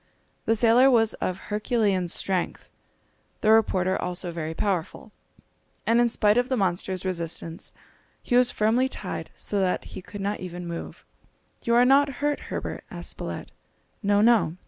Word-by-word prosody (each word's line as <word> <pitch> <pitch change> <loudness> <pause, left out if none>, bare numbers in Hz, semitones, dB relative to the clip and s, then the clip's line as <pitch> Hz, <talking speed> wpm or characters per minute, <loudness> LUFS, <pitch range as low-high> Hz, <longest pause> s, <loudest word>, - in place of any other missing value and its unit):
The 225 - +3
sailor 235 +4 +5
was 225 -4 +4
of 185 - -1
Herculean 210 -4 +1
strength, 180 +1 -2 0.7
the 215 - +4
reporter 190 -4 +3
also 180 0 -3
very 160 -1 -4
powerful, 185 -3 -2 0.7
and 230 +1 +4
in 240 - +3
spite 215 0 +3
of 245 +1 -1
the 260 - +1
monster's 185 -1 -1
resistance 170 -2 -3 0.5
he 245 - 0
was 250 0 +5
firmly 235 +5 +2
tied - - -5
so 205 - -2
that 185 -2 0
he - - -6
could 205 +2 -9
not 200 +1 -2
even 180 -1 -6
move. 170 0 -7 0.6
"You 235 - +1
are 245 +1 +6
not 275 +2 +4
hurt, 295 0 0
Herbert," - - -4
asked - - -4
Spilett. - - -6 0.5
"No, 205 -1 +3
no!" 215 -7 +4
205 Hz, 155 wpm, -26 LUFS, 180-235 Hz, 0.7 s, are